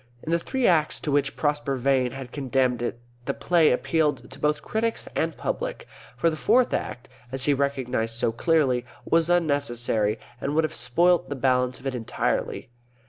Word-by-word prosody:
In 160 Hz, -, -4 dB
the 170 Hz, -, +3 dB
three 260 Hz, +8 st, -1 dB
Acts 160 Hz, -4 st, +3 dB
to 150 Hz, -, -2 dB
which 140 Hz, -1 st, +1 dB
Prosper 145 Hz, -2 st, 0 dB
Vane 130 Hz, 0 st, +2 dB
had 135 Hz, -2 st, -8 dB
condemned 130 Hz, -3 st, 0 dB
it 120 Hz, -1 st, -3 dB, 0.3 s
the 140 Hz, -, -2 dB
play 170 Hz, -3 st, +3 dB
appealed 145 Hz, -2 st, 0 dB
to 130 Hz, -, -10 dB
both 150 Hz, +1 st, 0 dB
critics 225 Hz, +1 st, -2 dB
and -, -, -1 dB
public, -, -, -4 dB, 0.3 s
for 165 Hz, -, +2 dB
the -, -, -3 dB
Fourth 235 Hz, +10 st, +3 dB
Act 120 Hz, -, -3 dB, 0.2 s
(as 130 Hz, 0 st, 0 dB
he 145 Hz, -, +4 dB
recognised 130 Hz, -5 st, -1 dB
so 115 Hz, 0 st, +1 dB
clearly) 130 Hz, -1 st, +2 dB, 0.2 s
was 165 Hz, 0 st, +2 dB
unnecessary, 120 Hz, -10 st, +1 dB, 0.2 s
and 145 Hz, +2 st, -2 dB
would 160 Hz, -, +3 dB
have 155 Hz, -, -2 dB
spoilt 170 Hz, +8 st, +2 dB
the 145 Hz, -, -3 dB
balance 125 Hz, -1 st, +1 dB
of 130 Hz, -, -16 dB
it 135 Hz, -, -1 dB
entirely. 120 Hz, 0 st, -2 dB
140 Hz, 180 wpm, -25 LUFS, 125-160 Hz, 0.3 s, he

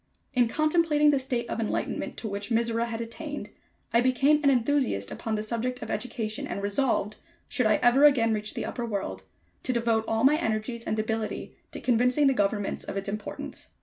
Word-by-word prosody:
In 245 Hz, -2 st, +4 dB
contemplating 305 Hz, +2 st, +3 dB
the 280 Hz, -, +2 dB
state 245 Hz, -3 st, -2 dB
of -, -, -3 dB
enlightenment 220 Hz, -, -2 dB
to 225 Hz, -, -4 dB
which 200 Hz, +1 st, -4 dB
Mizora 230 Hz, 0 st, +1 dB
had 230 Hz, 0 st, -4 dB
attained, 290 Hz, +6 st, -6 dB, 0.4 s
I 235 Hz, -, +5 dB
became 270 Hz, +4 st, +3 dB
an 280 Hz, -, +5 dB
enthusiast 255 Hz, -, +1 dB
upon 220 Hz, -1 st, -3 dB
the 210 Hz, -, -2 dB
subject 240 Hz, +3 st, -3 dB
of -, -, -5 dB
education, 225 Hz, -3 st, -3 dB
and 200 Hz, -, -4 dB
resolved, 210 Hz, 0 st, 0 dB, 0.3 s
should 250 Hz, -4 st, +1 dB
I 215 Hz, -, +4 dB
ever 245 Hz, +4 st, +5 dB
again 235 Hz, -6 st, +5 dB
reach 210 Hz, 0 st, -3 dB
the -, -, -3 dB
upper 240 Hz, -, -4 dB
world, 190 Hz, -, -4 dB, 0.4 s
to 255 Hz, -, -1 dB
devote 230 Hz, -2 st, +1 dB
all 225 Hz, +1 st, 0 dB
my 290 Hz, +3 st, +6 dB
energies 230 Hz, -3 st, -2 dB
and 215 Hz, -, -1 dB
ability 220 Hz, 0 st, -3 dB, 0.2 s
to -, -, -7 dB
convincing 250 Hz, +4 st, +3 dB
the 270 Hz, -, +5 dB
governments 205 Hz, -2 st, 0 dB
of -, -, -5 dB
its 195 Hz, -, -3 dB
importance. 205 Hz, +1 st, -5 dB
235 Hz, 190 wpm, -27 LUFS, 215-260 Hz, 0.4 s, my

